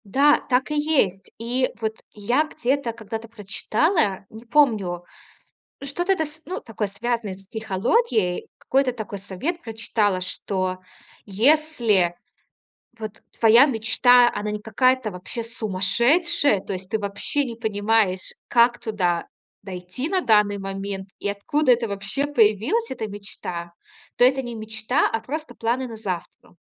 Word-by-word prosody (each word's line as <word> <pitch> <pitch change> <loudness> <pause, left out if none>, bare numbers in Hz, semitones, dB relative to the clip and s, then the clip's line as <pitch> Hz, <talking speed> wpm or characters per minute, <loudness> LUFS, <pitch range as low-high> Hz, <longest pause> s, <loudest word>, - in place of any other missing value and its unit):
Да, 290 +2 +5
так 260 +3 +1
и - - 0
есть. 290 - +1
И 245 +3 0
вот 220 -1 -2 0.2
я 240 +8 +1
где-то 275 -4 -1
когда-то 225 0 -7
прочитала, 215 - 0
не 220 +1 -11
помню, 215 -10 +2 0.8
что-то 350 +7 0
это 320 - -1
с 305 +1 -11
ну, 365 - -3
такое 220 -2 -4
связанное 225 0 -2
с 195 - -16
психологией, 220 - 0
какой-то 265 -1 +1
такой 220 -4 -6
совет 220 - -4
прочитала, 215 -4 -1
что 185 0 -3 0.5
если 225 - +2 0.8
вот 215 -2 -7 0.2
твоя 230 +5 +7
мечта, 245 0 +4
она 210 - -3
не 210 0 -3
какая-то 255 +1 +2
вообще 185 +6 -5
сумасшедшая, 235 - +2
то - - -5
есть 185 0 -6
ты 220 - 0
вообще 205 +8 -1
не 235 -3 -6
понимаешь, 210 -3 0
как 240 0 +4
туда 180 -6 -1 0.3
дойти 185 - -5
на 375 0 +1
данный 210 - +3
момент 195 0 -5
и 205 - -2
откуда 255 +8 +1
это 235 -1 -1
вообще 200 +7 -2
появилась 255 - +2
эта 225 -4 -4
мечта, 180 -4 -7 0.4
то - - +3
это 265 +2 +5
не 240 -2 -6
мечта, 220 0 0
а 225 - -1
просто 305 +8 -6
планы 240 +3 -1
на 225 -2 -8
завтра. 180 -5 -6
225 Hz, 140 wpm, -23 LUFS, 200-260 Hz, 0.8 s, твоя